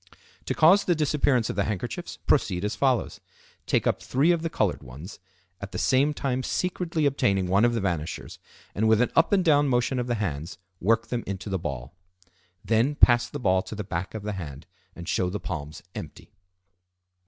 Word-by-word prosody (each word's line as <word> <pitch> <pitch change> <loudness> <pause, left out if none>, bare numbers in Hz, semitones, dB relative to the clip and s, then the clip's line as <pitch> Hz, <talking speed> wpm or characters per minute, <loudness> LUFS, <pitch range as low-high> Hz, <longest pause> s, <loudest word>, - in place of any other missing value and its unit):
To - - -2
cause 185 +6 +5
the 175 - +2
disappearance 145 -6 +2
of - - -7
the 100 - +1
handkerchiefs, 105 -4 -4
proceed 90 +2 +1
as 105 - -2
follows: 130 -4 0 0.5
Take - - +1
up - - +1
three 140 +7 +2
of 170 -2 +1
the 165 - -2
colored 105 - 0
ones, 70 - -10 0.4
at 100 0 -7
the - - -3
same 135 +3 +3
time 130 -3 -2
secretly 170 +1 -1
obtaining 100 -9 +2
one 95 +4 +3
of 120 0 +2
the 115 - -1
vanishers, 85 -5 -3 0.3
and, 110 +2 +1
with 110 -1 +4
an 125 - +2
up - - +4
and 190 -3 +3
down 145 -2 +4
motion 125 0 +1
of 125 - -2
the 120 - 0
hands, 85 -5 -4 0.2
work 115 +4 +1
them 120 -2 -2
into 100 +1 -5
the 95 - 0
ball. 70 -5 -5 0.7
Then 115 +6 +2
pass 120 -3 +5
the - - -6
ball 95 -5 +2
to 110 - -8
the 105 - -4
back 95 +1 -4
of 110 - -5
the 105 0 -3
hand 75 -6 -7 0.3
and 85 0 -9
show 90 0 0
the 105 +3 -4
palms 75 -3 -6
empty. - - -9
110 Hz, 200 wpm, -26 LUFS, 95-135 Hz, 0.7 s, cause